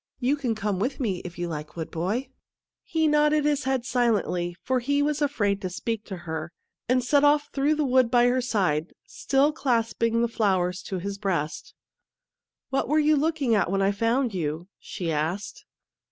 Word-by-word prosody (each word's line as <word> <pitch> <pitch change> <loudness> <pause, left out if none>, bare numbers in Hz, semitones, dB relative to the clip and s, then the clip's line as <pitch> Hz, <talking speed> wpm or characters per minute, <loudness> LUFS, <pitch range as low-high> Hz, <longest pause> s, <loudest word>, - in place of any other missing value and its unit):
You 265 +3 +2
can 250 -6 -2
come 205 -3 -2
with 250 +7 -2
me 210 -8 -1
if 175 -2 -9
you 175 0 -2
like, 150 -2 -6
wood 160 -2 -5
boy." 210 +11 -2 0.5
He 320 -1 0
nodded 300 0 +3
his 290 -2 +1
head 265 -2 0
silently, 205 -9 0
for 260 -1 +1
he 285 +4 +1
was 300 0 -1
afraid 205 -9 0
to 185 - -3
speak 220 +4 -4
to 190 - -6
her, 160 0 -4 0.4
and 255 0 +3
set 285 +3 +3
off 290 0 +4
through 290 +2 +2
the 305 -1 0
wood 255 -2 +3
by 240 0 +4
her 250 +1 +2
side, 185 -10 0
still 280 +2 +1
clasping 230 -4 +1
the - - +2
flowers 190 -5 0
to 190 - -2
his 200 +2 -5
breast. 175 -7 -3 0.5
" - - -66
What 270 - 0
were 305 - +3
you 305 0 +4
looking 295 -4 +1
at 200 -5 +2
when 195 +1 +1
I 195 - +3
found 230 +3 0
you? 165 0 -3
" - - -68
she 175 -5 -4
asked. 160 +7 -3
230 Hz, 195 wpm, -26 LUFS, 185-275 Hz, 0.5 s, off